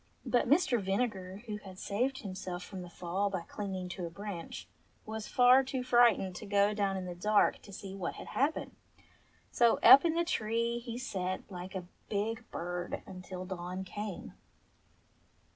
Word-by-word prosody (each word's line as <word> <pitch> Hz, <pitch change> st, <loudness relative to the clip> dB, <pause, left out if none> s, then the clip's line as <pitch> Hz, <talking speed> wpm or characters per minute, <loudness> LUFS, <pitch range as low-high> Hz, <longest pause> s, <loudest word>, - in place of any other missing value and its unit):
But 245 Hz, -1 st, +2 dB
Mr. 270 Hz, -, +4 dB
Vinegar, 195 Hz, -1 st, -2 dB
who 210 Hz, -3 st, -4 dB
had 190 Hz, -3 st, -11 dB
saved 250 Hz, +8 st, -1 dB
himself 185 Hz, -2 st, -5 dB
from 190 Hz, -3 st, -7 dB
the 175 Hz, -, -8 dB
fall 185 Hz, +4 st, -1 dB
by 185 Hz, -3 st, -2 dB
clinging 190 Hz, 0 st, -5 dB
to 180 Hz, -1 st, -4 dB
a -, -, -6 dB
branch, 180 Hz, -1 st, -7 dB, 0.4 s
was 220 Hz, 0 st, -5 dB
far 250 Hz, +1 st, +6 dB
too 260 Hz, -1 st, -3 dB
frightened 240 Hz, -7 st, +4 dB
to 210 Hz, -, -8 dB
go 200 Hz, +1 st, +3 dB
down 200 Hz, -2 st, 0 dB
in 185 Hz, -, -4 dB
the 180 Hz, -, -4 dB
dark 210 Hz, +4 st, +2 dB
to 200 Hz, -, -13 dB
see 195 Hz, 0 st, -7 dB
what 190 Hz, -3 st, -4 dB
had -, -, -9 dB
happened. 285 Hz, +4 st, 0 dB, 0.8 s
So 235 Hz, -1 st, +4 dB
up 275 Hz, -, +10 dB
in 330 Hz, -1 st, +1 dB
the 340 Hz, 0 st, +2 dB
tree 230 Hz, -5 st, 0 dB
he 235 Hz, -1 st, -6 dB
sate 185 Hz, -7 st, -3 dB
like 185 Hz, +1 st, -7 dB
a 185 Hz, -2 st, -4 dB, 0.2 s
big 220 Hz, +3 st, -2 dB
bird 175 Hz, +1 st, -4 dB
until 185 Hz, -1 st, -7 dB
dawn 180 Hz, 0 st, -5 dB
came. 205 Hz, +1 st, -6 dB
200 Hz, 170 wpm, -32 LUFS, 185-235 Hz, 0.8 s, up